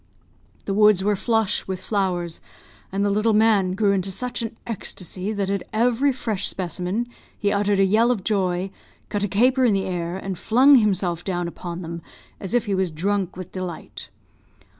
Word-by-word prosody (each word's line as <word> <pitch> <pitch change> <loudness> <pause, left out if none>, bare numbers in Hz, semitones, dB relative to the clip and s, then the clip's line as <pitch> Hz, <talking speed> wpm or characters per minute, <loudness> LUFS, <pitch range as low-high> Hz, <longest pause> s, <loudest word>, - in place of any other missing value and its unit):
The 195 - -1
woods 210 -2 +5
were 205 +1 +2
flush 225 0 0
with 190 -1 -3
flowers; 180 -5 -2 0.5
and 200 +1 0
the 205 - +2
little 215 +2 +2
man 210 -4 +3
grew 200 +1 +2
into 195 -1 0
such 250 +6 -3
an 225 0 -5
ecstacy, 190 -3 -4
that 200 -2 -1
at 200 -2 -1
every 245 +5 +2
fresh 220 -6 -2
specimen 185 +4 -2 0.3
he 205 - 0
uttered 205 -1 +1
a 195 - +5
yell 220 +5 +3
of 230 -6 0
joy, 190 -3 0 0.4
cut 205 -1 -1
a - - +2
caper 250 +7 +3
in 235 -4 +4
the 195 -1 0
air, 175 -1 -3
and 190 -2 -5
flung 265 +5 +6
himself 185 -6 +1
down 175 -2 -2
upon 175 +1 -6
them, 170 0 -6 0.4
as 195 +4 -3
if 240 - +2
he 205 - -1
was 190 -1 +1
drunk 190 +3 -1
with 185 -1 -7
delight. 185 -3 -7
195 Hz, 180 wpm, -23 LUFS, 185-220 Hz, 0.5 s, flung